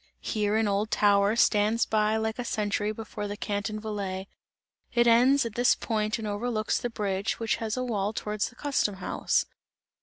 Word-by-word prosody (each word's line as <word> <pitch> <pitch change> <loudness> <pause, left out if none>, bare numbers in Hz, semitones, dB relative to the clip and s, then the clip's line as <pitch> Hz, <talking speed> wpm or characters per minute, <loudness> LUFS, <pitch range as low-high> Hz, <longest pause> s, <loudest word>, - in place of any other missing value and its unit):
Here 210 -1 -1
an 220 -1 +2
old 205 +2 0
tower 205 0 +3
stands 220 0 +3
like 220 +1 +1
a - - -1
sentry 210 -2 -1
before 215 -1 -6
the 205 0 -5
Canton 210 +1 -3
Valais; 200 -3 -4 0.7
it 240 0 +4
ends 245 +3 +5
at 230 - -4
this 245 +2 +3
point 215 -1 -1
and 220 -2 -5
overlooks 215 +1 -1
the 245 - -3
bridge, 200 -3 -2
which 225 -1 0
has 225 +1 -3
a 255 - -1
wall 210 -4 -1
towards 210 -1 -2
the 250 - -20
custom 265 -8 0
house. 190 - 0
215 Hz, 175 wpm, -27 LUFS, 205-230 Hz, 0.7 s, ends